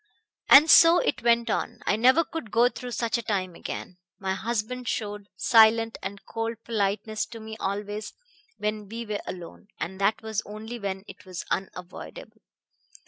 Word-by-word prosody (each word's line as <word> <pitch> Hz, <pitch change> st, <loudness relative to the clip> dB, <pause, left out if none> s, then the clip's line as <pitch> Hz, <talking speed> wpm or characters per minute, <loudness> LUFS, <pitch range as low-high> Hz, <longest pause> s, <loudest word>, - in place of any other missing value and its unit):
"And 295 Hz, +3 st, +9 dB
so 330 Hz, +1 st, +8 dB
it -, -, 0 dB
went 235 Hz, -1 st, +3 dB
on. -, -, -2 dB
I -, -, +2 dB
never 255 Hz, +9 st, +5 dB
could 315 Hz, -8 st, -7 dB
go 235 Hz, +3 st, +4 dB
through 250 Hz, 0 st, -8 dB
such 235 Hz, 0 st, -1 dB
a -, -, -3 dB
time 190 Hz, -5 st, -2 dB
again. 180 Hz, +2 st, -7 dB, 0.2 s
My 190 Hz, -1 st, -2 dB
husband 235 Hz, +4 st, -3 dB
showed 205 Hz, -2 st, -3 dB
silent 225 Hz, 0 st, +5 dB
and 195 Hz, +1 st, -7 dB
cold 225 Hz, 0 st, -3 dB
politeness 215 Hz, -1 st, -1 dB
to 230 Hz, -, -9 dB
me 220 Hz, 0 st, -8 dB
always 205 Hz, +2 st, -3 dB, 0.5 s
when 210 Hz, 0 st, -3 dB
we 230 Hz, +2 st, -5 dB
were 210 Hz, -1 st, -3 dB
alone 175 Hz, +2 st, -8 dB
and 190 Hz, +3 st, -5 dB
that 205 Hz, +3 st, +1 dB
was 220 Hz, -1 st, -2 dB
only 220 Hz, +3 st, -8 dB
when 195 Hz, -2 st, -4 dB
it -, -, -12 dB
was 180 Hz, -2 st, -6 dB
unavoidable. 180 Hz, -1 st, -6 dB
215 Hz, 165 wpm, -26 LUFS, 200-235 Hz, 0.5 s, And